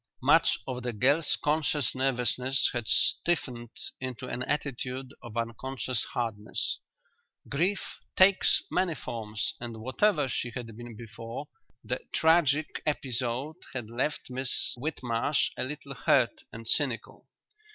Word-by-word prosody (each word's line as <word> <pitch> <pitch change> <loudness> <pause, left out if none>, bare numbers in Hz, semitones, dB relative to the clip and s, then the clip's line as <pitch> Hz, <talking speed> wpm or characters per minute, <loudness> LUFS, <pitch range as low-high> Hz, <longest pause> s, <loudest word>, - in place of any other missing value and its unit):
Much - - +5
of 125 -1 -3
the 120 -1 -2
girl's 140 +8 +3
conscious 150 -2 +2
nervousness 130 0 +1
had 120 -3 -2
stiffened 125 -9 +2 0.3
into 130 0 -5
an 125 - -3
attitude 130 -2 -2
of 120 -1 -8
unconscious 125 +2 -2
hardness. 110 -3 -1 0.7
Grief 180 +8 0 0.2
takes 190 0 +5
many 180 -3 +2
forms, 110 -5 -3
and 120 -2 -5
whatever 145 - +2
she 125 -1 -2
had 115 -3 -5
been 120 0 -8
before, 115 +4 -7 0.3
the 125 - -2 0.2
tragic 160 -2 +3
episode 130 +1 -1 0.2
had 120 -4 -5
left 130 +3 -1
Miss 130 +1 0
Whitmarsh 130 0 0
a - - -1
little 140 +1 -5
hurt 125 0 +3 0.2
and 115 0 -8
cynical. 130 -3 +1
130 Hz, 120 wpm, -29 LUFS, 120-145 Hz, 0.7 s, Much